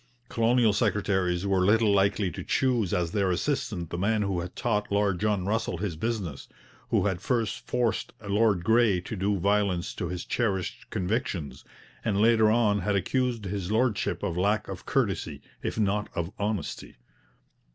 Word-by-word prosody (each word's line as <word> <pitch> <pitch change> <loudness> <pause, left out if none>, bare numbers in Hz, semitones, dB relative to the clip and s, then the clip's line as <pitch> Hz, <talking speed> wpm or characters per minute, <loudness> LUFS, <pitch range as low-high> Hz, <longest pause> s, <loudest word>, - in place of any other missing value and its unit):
Colonial 115 -1 +3
secretaries 95 -3 +1
were 95 -2 +2
little 110 +2 +4
likely 100 -1 +2
to - - -7
choose 120 -8 +1
as 85 -2 0
their 100 -1 +1
assistant 90 - -2
the 85 - -3
man 105 +2 +1
who 95 -3 -1
had 90 +1 -6
taught 105 -4 -1
Lord 100 -3 +1
John 105 -3 0
Russell 110 -3 -1
his 95 -2 -3
business, 95 -5 -3 0.4
who - - +2
had 95 -3 -1
first 115 -5 -1
forced 120 -2 0 0.2
Lord 100 -3 +2
Grey 110 -3 +4
to 100 - -6
do 100 +1 0
violence 100 -2 +1
to 90 - -4
his 90 0 -5
cherished 100 -7 -2
convictions, 90 - -2 0.4
and 100 -2 0
later 110 0 +5
on 110 -2 +3
had 100 +2 0
accused 120 +3 0
his 95 0 -3
Lordship 115 -2 0
of 90 -5 -1
lack 100 +4 +1
of - - -8
courtesy, - - -1 0.2
if - - -3
not 105 0 0
of 85 +1 -2
honesty. 100 -6 -3
100 Hz, 160 wpm, -27 LUFS, 90-110 Hz, 0.4 s, later